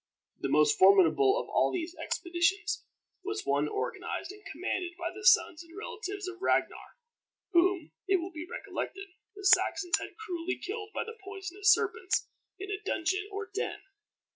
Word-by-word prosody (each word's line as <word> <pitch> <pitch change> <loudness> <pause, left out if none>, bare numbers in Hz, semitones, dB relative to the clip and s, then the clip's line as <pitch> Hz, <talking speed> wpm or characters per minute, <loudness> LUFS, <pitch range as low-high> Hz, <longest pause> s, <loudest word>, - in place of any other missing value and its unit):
The - - -2
most 435 -1 +4
formidable 395 +3 +6
of - - -5
all - - +2
these 345 -1 -3
expeditions 360 +4 0 0.4
was 405 +1 -3
one - - +2
organized 415 -2 -3
and 415 +1 -13
commanded 360 +2 -3
by 340 -1 -3
the 415 +2 -10
sons 370 -4 +5
and 335 +2 -15
relatives 405 -2 -5
of 365 0 -7
Ragnar, - - 0 0.6
whom, 345 -2 +3 0.2
it 390 - +4
will 360 +1 -2
be 325 +1 -7
recollected, 390 +1 -5 0.3
the 405 -1 -9
Saxons 365 -2 +4
had - - -8
cruelly 365 -4 -3
killed 420 +2 -5
by - - -2 0.2
poisonous 390 +1 +1
serpents 415 -3 +1 0.3
in 395 +1 -6
a 395 - -3
dungeon 380 +1 -1
or 400 -1 -5
den. 430 +4 -3
385 Hz, 155 wpm, -30 LUFS, 360-410 Hz, 0.6 s, formidable